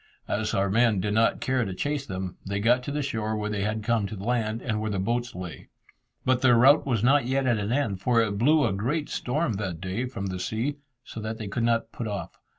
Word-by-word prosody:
As 105 0 -1
our 100 0 +2
men 110 0 +3
did 105 +2 -1
not 115 +1 +2
care 130 -1 +1
to 95 -4 -4
chase 145 +5 -2
them, 95 -1 -4
they 100 +1 -2
got 120 +4 +3
to - - -3
the 150 0 -1
shore 110 -5 -2
where 105 0 -2
they 105 -2 -2
had 110 +1 -1
come 115 -2 +1
to 110 - -6
land 110 +2 -1
and 110 -3 -2
where 110 - -2
the 100 - -2
boats 120 +5 -1
lay. 90 -3 -8 0.6
But 130 -1 +2
their 125 -3 +5
rout 140 +5 +6
was 115 -5 +1
not 135 0 +4
yet 135 +1 +1
at 120 -4 +2
an 105 +2 -2
end, 115 -8 0
for 120 +2 +3
it 105 -3 0
blew 150 +5 +4
a 105 - +1
great 135 +11 -1
storm 130 0 -1
that 95 -5 -4
day 95 +7 -2
from 100 -6 -5
the 95 -1 -3
sea, 115 +10 -2 0.3
so 110 - -8
that 110 +1 -4
they 110 - -5
could 110 +5 -2
not 115 -1 +1
put 115 - -5
off. 100 -2 -5
110 Hz, 250 wpm, -26 LUFS, 100-125 Hz, 0.6 s, rout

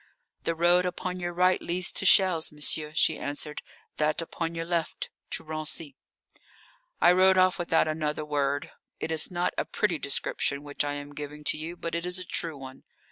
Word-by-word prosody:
"The 165 - 0
road 175 +2 +4
upon 180 +1 -4
your 175 -1 -2
right 180 +1 +3
leads 180 +2 +1
to 190 - -1
Chelles, 180 -5 +5
monsieur," 150 0 -1
she 160 -1 +2
answered. 145 +1 -4 0.4
"That 150 0 +1
upon 165 0 -2
your 165 0 -3
left 170 -2 -2 0.2
to - - -3
Raincy." 155 -1 -4 1.1
I 175 - +7
rode 185 +1 +5
off 185 0 +4
without 165 -2 +2
another 155 -1 -2
word. 145 -1 -1 0.3
It - - -3
is 160 -1 +3
not 175 -1 -1
a - - 0
pretty 185 -7 0
description 140 0 0
which 145 -1 -2
I 145 0 -2
am 145 0 -7
giving 150 +1 -7
to - - +2
you, 165 +3 -5
but 165 - -5
it 170 +1 -2
is 180 +1 0
a 185 - -4
true 165 -3 -3
one. 130 -1 -10
165 Hz, 190 wpm, -28 LUFS, 150-175 Hz, 1.1 s, I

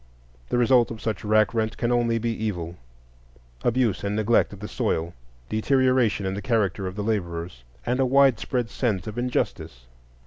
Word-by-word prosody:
The - - +1
result 120 0 +4
of 115 - -7
such 110 -3 -3
rack 110 0 +3
rent 110 -1 -1
can 120 0 0
only 120 -1 +2
be 115 +1 -1
evil,—abuse 60 - -4
and 100 +1 -1
neglect 110 +2 +2
of 100 - -10
the 105 - -6
soil, 85 -3 -1 0.3
deterioration 125 -2 +2
in 95 - -1
the 100 - -4
character 105 -6 0
of 90 - -6
the 105 - -3
laborers, 85 - -3 0.2
and 125 +2 0
a 135 - +4
widespread 125 -2 +2
sense 105 -9 -1
of 110 +3 -5
injustice. 120 - -2
110 Hz, 165 wpm, -25 LUFS, 90-120 Hz, 0.3 s, result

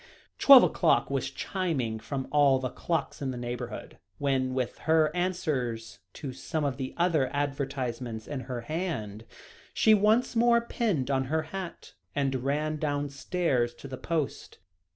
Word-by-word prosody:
Twelve 275 -3 +10
o'clock - - +2
was - - -1
chiming 140 - -2
from 130 +4 -4
all 145 -2 +5
the 130 -1 -3
clocks 165 -3 -2
in 135 - -1
the 130 - -4
neighbourhood, 120 0 -6 0.2
when, 130 -2 0
with 125 -2 -2
her 160 0 +4
answers 145 - -2
to 135 -3 -6
some 155 +3 -3
of 135 -3 -1
the 130 -1 -5
other 165 -7 +2
advertisements 135 -5 -3
in 145 - -4
her 125 -2 -3
hand, 115 - -4 0.5
she 220 - +5
once 215 +5 +3
more 235 0 +5
pinned 210 - -1
on 135 -1 +1
her 155 +4 0
hat, 190 -3 -6 0.2
and 135 -3 0
ran 150 +3 0
downstairs 145 -3 -1
to 140 - -10
the 135 - -6
post. 155 +1 -3
140 Hz, 150 wpm, -28 LUFS, 130-165 Hz, 0.5 s, Twelve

